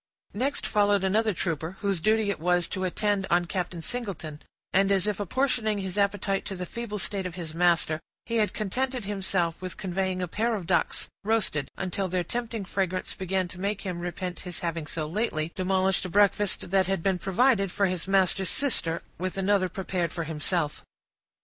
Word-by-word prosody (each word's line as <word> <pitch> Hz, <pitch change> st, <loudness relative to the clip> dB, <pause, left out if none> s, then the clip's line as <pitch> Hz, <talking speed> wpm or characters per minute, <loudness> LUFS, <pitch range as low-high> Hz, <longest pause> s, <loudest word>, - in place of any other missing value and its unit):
Next 265 Hz, +7 st, 0 dB
followed 205 Hz, -1 st, +3 dB
another 215 Hz, +3 st, +3 dB
trooper, 170 Hz, -1 st, -2 dB
whose 195 Hz, -5 st, +1 dB
duty 215 Hz, +1 st, +3 dB
it -, -, -4 dB
was 175 Hz, +1 st, +2 dB
to 185 Hz, 0 st, -2 dB
attend 200 Hz, +1 st, 0 dB
on 175 Hz, 0 st, +3 dB
Captain 175 Hz, -2 st, -3 dB
Singleton; 175 Hz, -10 st, -4 dB, 0.3 s
and, 195 Hz, +1 st, +4 dB
as 195 Hz, -1 st, +3 dB
if 210 Hz, -1 st, -1 dB
apportioning 220 Hz, 0 st, +1 dB
his 190 Hz, -2 st, -3 dB
appetite 200 Hz, -1 st, +1 dB
to 195 Hz, -, -4 dB
the 180 Hz, 0 st, -4 dB
feeble 230 Hz, +2 st, -4 dB
state 190 Hz, +1 st, -1 dB
of 175 Hz, -, -8 dB
his 165 Hz, -4 st, -5 dB
master, 170 Hz, -2 st, +3 dB, 0.3 s
he 230 Hz, -1 st, -1 dB
had 210 Hz, -3 st, +2 dB
contented 250 Hz, +4 st, -1 dB
himself 190 Hz, -4 st, -1 dB
with 185 Hz, -1 st, -5 dB
conveying 185 Hz, 0 st, -1 dB
a 180 Hz, -, -1 dB
pair 225 Hz, +6 st, 0 dB
of 195 Hz, -5 st, -4 dB
ducks, 170 Hz, -1 st, +1 dB, 0.2 s
roasted, 210 Hz, -9 st, +1 dB
until 190 Hz, +1 st, -1 dB
their 180 Hz, 0 st, 0 dB
tempting 230 Hz, +1 st, -3 dB
fragrance 185 Hz, -1 st, -1 dB
began 185 Hz, 0 st, -1 dB
to 180 Hz, -, -9 dB
make 200 Hz, +1 st, -1 dB
him 180 Hz, -3 st, -3 dB
repent 175 Hz, +1 st, -4 dB
his 180 Hz, -2 st, -7 dB
having 165 Hz, -2 st, -2 dB
so 155 Hz, +1 st, -2 dB
lately 165 Hz, -3 st, -1 dB
demolished 190 Hz, 0 st, +1 dB
a 185 Hz, -, -4 dB
breakfast 205 Hz, -1 st, +2 dB
that 190 Hz, -2 st, +4 dB
had 195 Hz, -3 st, 0 dB
been 190 Hz, -2 st, +2 dB
provided 195 Hz, +1 st, +3 dB
for 200 Hz, -, +2 dB
his 180 Hz, -2 st, -1 dB
master's 190 Hz, -1 st, +3 dB
sister, 170 Hz, -12 st, +1 dB, 0.2 s
with 185 Hz, +1 st, -2 dB
another 195 Hz, -1 st, +2 dB
prepared 180 Hz, -2 st, -2 dB
for 170 Hz, -, -3 dB
himself. 160 Hz, 0 st, -1 dB
190 Hz, 185 wpm, -27 LUFS, 175-205 Hz, 0.3 s, and